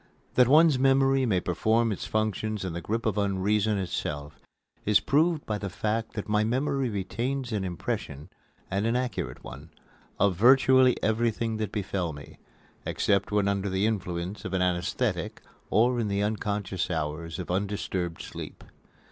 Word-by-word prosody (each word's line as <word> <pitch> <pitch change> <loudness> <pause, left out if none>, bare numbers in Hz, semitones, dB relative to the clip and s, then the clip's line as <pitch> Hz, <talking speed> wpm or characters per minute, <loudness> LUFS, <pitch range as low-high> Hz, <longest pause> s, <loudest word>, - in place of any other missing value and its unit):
That 125 -1 +5
one's 150 0 +6
memory 135 0 +3
may 95 -5 +2
perform 110 +7 +1
its 100 - -4
function 110 0 -1
in 95 -3 -3
the 85 - -4
grip 115 +6 -2
of 105 -2 +1
Unreason 100 +2 +1
itself 75 -5 -4 0.4
is 105 0 +4
proved 155 +6 +1
by 105 -1 -2
the 100 - -4
fact 110 +4 -2
that 105 - -5
my 105 0 +2
memory 135 +3 0
retains 120 +6 -3
an 105 -3 -1
impression, 75 -5 -4 0.4
and 100 +3 0
an 115 - +1
accurate 125 0 -3
one, - - -10 0.5
of 100 -1 +3
virtually 130 +4 +5
everything 115 0 0
that 110 -2 -3
befell 95 -5 -2
me, 70 0 -12 0.4
except 100 0 0
when 105 -1 +2
under 100 0 0
the 95 +2 +1
influence 90 -2 -3
of 95 - -5
an 95 - +1
anaesthetic 90 -1 -1 0.3
or 120 +3 +3
in 115 - 0
the 100 0 0
unconscious 105 -3 -2
hours 80 0 -3
of 90 -1 -5
undisturbed 95 -3 -2
sleep. - - -8
105 Hz, 155 wpm, -27 LUFS, 95-115 Hz, 0.5 s, one's